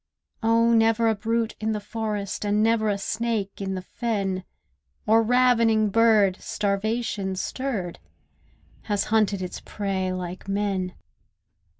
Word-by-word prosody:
Oh, 230 +1 +3
never 225 0 +3
a - - +3
brute 225 +2 -1
in 220 0 -1
the 210 - -2
forest, 210 -1 -4
And 210 +1 +2
never 225 -1 +2
a 200 - 0
snake 215 -1 -2
in 190 -1 -2
the 185 - -5
fen, 195 -4 -2 0.6
Or 225 +1 +5
ravening 230 -2 +3
bird, 215 -4 +4
starvation 205 -1 -1
stirred, 200 -4 -3 0.9
Has 205 -2 0
hunted 205 -3 +2
its 180 - -5
prey 190 -2 -3
like 185 +1 -6
men. 195 -2 -1
210 Hz, 125 wpm, -25 LUFS, 195-225 Hz, 0.9 s, Or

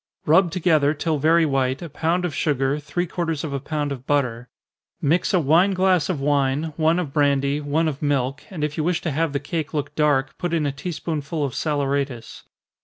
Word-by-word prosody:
_ - - -71 0.2
Rub 170 +4 +5
together, 155 -4 +2
till 155 0 -1
very 165 +3 +4
white, 135 0 0
a - - -5
pound 165 +4 -1
of 170 - -3
sugar, 145 -1 0
three 150 +4 -2
quarters 165 -3 -3
of 150 -3 -4
a 140 - -1
pound 145 +1 -3
of 130 -1 -7
butter. 125 -4 0 0.5
Mix 160 +5 +1
a 185 - +3
wine 170 +6 +3
glass 185 -3 +2
of 175 -6 -1
wine, 145 +2 0
one 160 +1 +2
of 160 -7 -3
brandy, 140 0 +2
one 150 +3 0
of 145 -3 -4
milk, 135 -2 0
and 170 -6 -5
if 150 0 -2
you 155 - 0
wish 175 +1 +1
to 160 - -2
have 160 +2 0
the 140 - -1
cake 155 +2 -4
look 145 -1 -2
dark, 145 -3 +1
put 175 -2 -1
in 155 -2 0
a 145 - 0
tea 140 +6 -5
spoonful 155 -2 -3
of 135 - -4
saleratus. 140 -5 -2
150 Hz, 215 wpm, -23 LUFS, 140-165 Hz, 0.5 s, Rub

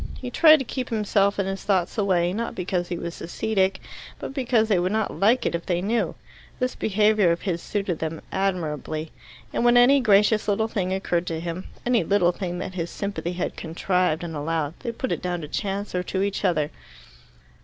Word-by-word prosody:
He 250 -1 -6
tried 315 +3 +7
to 270 - -4
keep 255 +1 -4
himself 205 -2 +1
and 195 -1 0
his 195 0 -4
thoughts 185 -4 +1
away, 185 -5 +2
not 230 +3 -3
because 180 -1 -2
he 175 - -3
was 170 0 -6
ascetic, 190 +2 0 0.4
but - - -6
because 245 -5 +2
they 200 -5 +3
would 180 +2 0
not 220 -1 -1
like 230 +6 +3
it - - 0
if 170 0 -4
they 175 -2 +1
knew. 220 +5 0 0.4
This 255 0 -1
behaviour 210 -2 +3
of 170 - -1
his 175 -4 -2
suited 195 -5 -2
them 160 0 -3
admirably. 160 -5 -2 0.4
And - - 0
when 240 0 +5
any 260 +3 +6
gracious 210 -2 +4
little 215 +2 +1
thing 195 -5 -2
occurred 180 -2 -1
to 165 -1 -2
them 170 +2 -5 0.2
any 245 -5 +3
little 180 0 +3
thing 180 -1 -4
that 185 +1 -5
his 170 -2 -3
sympathy 200 -3 -4
had 175 - -3
contrived 175 0 0
and 165 -2 -5
allowed 150 0 -1
they 235 - -3
put 245 +3 -4
it - - -1
down 180 -1 -2
to 150 - -6
chance 200 +5 -3
or 180 - 0
to 190 +1 -2
each 200 0 -2
other. 155 -6 +1
190 Hz, 205 wpm, -24 LUFS, 175-215 Hz, 0.4 s, tried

